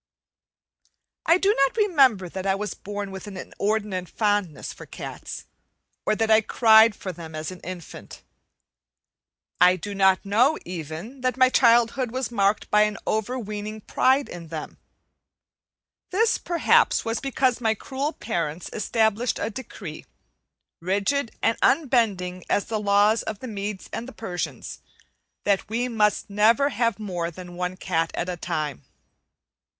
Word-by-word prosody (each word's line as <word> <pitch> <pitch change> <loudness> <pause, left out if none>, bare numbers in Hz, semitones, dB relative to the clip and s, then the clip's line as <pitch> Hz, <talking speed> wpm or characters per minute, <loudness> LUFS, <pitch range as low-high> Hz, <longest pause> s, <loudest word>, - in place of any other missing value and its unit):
I 335 - +6
do 395 +2 +3
not 275 +5 +1
remember 270 - +4
that 190 +2 -5
I 195 - +3
was 210 +1 -4
born 205 -1 -6
with 190 +2 -8
an 195 -2 -8
inordinate 200 -2 -2
fondness 205 -8 -1
for - - -12
cats; - - -8 0.6
or - - +3
that 225 0 +1
I 220 0 +7
cried 220 0 +5
for 185 - -5
them 160 -2 -9
as 155 +2 -4
an 185 - -10
infant. 175 -2 -9 1.4
I 180 0 +6
do 200 +3 -6
not 190 0 +3
know, 245 +10 +3
even, 175 - -7
that 255 0 0
my 255 0 +6
childhood 240 +1 +4
was 255 +1 -3
marked 200 -2 +1
by 210 - +5
an 210 -1 +1
overweening 215 -1 -3
pride 265 +6 +2
in 170 -2 -9
them; 155 -1 -7 1.3
this, 445 +4 +2
perhaps, 345 -1 +3
was 225 0 -1
because 260 -2 0
my 220 -1 +2
cruel 275 +6 -3
parents 170 - -4
established 220 +2 +1
a - - -2
decree, 200 -8 -8 0.7
rigid 200 +9 0
and 225 - +2
unbending 215 - +2
as 205 - +1
the 220 -1 -2
laws 205 +2 +3
of 215 - -5
the 255 - -8
Medes 205 -2 -5
and 255 +3 -6
Persians, 180 -6 -5 0.6
that 200 -1 +1
we 235 +3 -1
must 210 -4 +1
never 225 +7 +3
have 230 -3 0
more 180 -6 -3
than 175 +1 -10
one 180 +1 -3
cat 165 -3 -1
at 175 - -2
a 180 - -2
time. 155 -5 -3
210 Hz, 145 wpm, -24 LUFS, 185-240 Hz, 1.4 s, I